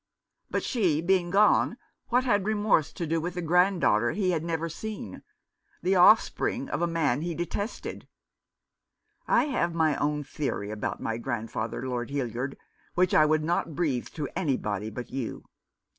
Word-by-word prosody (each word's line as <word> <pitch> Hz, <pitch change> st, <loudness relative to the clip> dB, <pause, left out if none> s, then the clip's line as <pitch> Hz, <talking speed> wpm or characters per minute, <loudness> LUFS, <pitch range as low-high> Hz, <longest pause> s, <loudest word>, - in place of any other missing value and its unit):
But, -, -, -1 dB
she 185 Hz, -, +1 dB
being 175 Hz, +1 st, +2 dB
gone, 210 Hz, +4 st, +4 dB, 0.3 s
what 250 Hz, +1 st, +2 dB
had 205 Hz, -6 st, +2 dB
remorse 210 Hz, -7 st, +2 dB
to 170 Hz, -, -4 dB
do 165 Hz, +1 st, 0 dB
with 175 Hz, +2 st, -4 dB
the 180 Hz, -, -2 dB
granddaughter 170 Hz, -, +3 dB
he 185 Hz, 0 st, +1 dB
had 165 Hz, -3 st, -1 dB
never 165 Hz, -1 st, -2 dB
seen 215 Hz, +6 st, -7 dB, 0.3 s
— -, -, -40 dB
the 185 Hz, -, +2 dB
offspring 225 Hz, +7 st, +4 dB
of -, -, -2 dB
a 175 Hz, -, +2 dB
man 150 Hz, -6 st, +1 dB
he 170 Hz, 0 st, -3 dB
detested? 185 Hz, +7 st, -4 dB, 1.2 s
I -, -, +4 dB
have 175 Hz, -, -1 dB
my 160 Hz, -3 st, +2 dB
own 150 Hz, 0 st, 0 dB
theory 135 Hz, -7 st, -3 dB
about 110 Hz, -1 st, -4 dB
my 115 Hz, -, -2 dB
grandfather, 115 Hz, 0 st, -3 dB
Lord 120 Hz, -2 st, -3 dB
Hildyard, 135 Hz, -1 st, -3 dB, 0.4 s
which 180 Hz, 0 st, +2 dB
I 155 Hz, -, +6 dB
would 155 Hz, 0 st, +2 dB
not 165 Hz, -1 st, -1 dB
breathe 140 Hz, -8 st, 0 dB
to 150 Hz, -3 st, -3 dB
anybody 110 Hz, -, -1 dB
but 120 Hz, +3 st, -7 dB
you. 130 Hz, -3 st, -4 dB
165 Hz, 160 wpm, -27 LUFS, 135-185 Hz, 1.2 s, I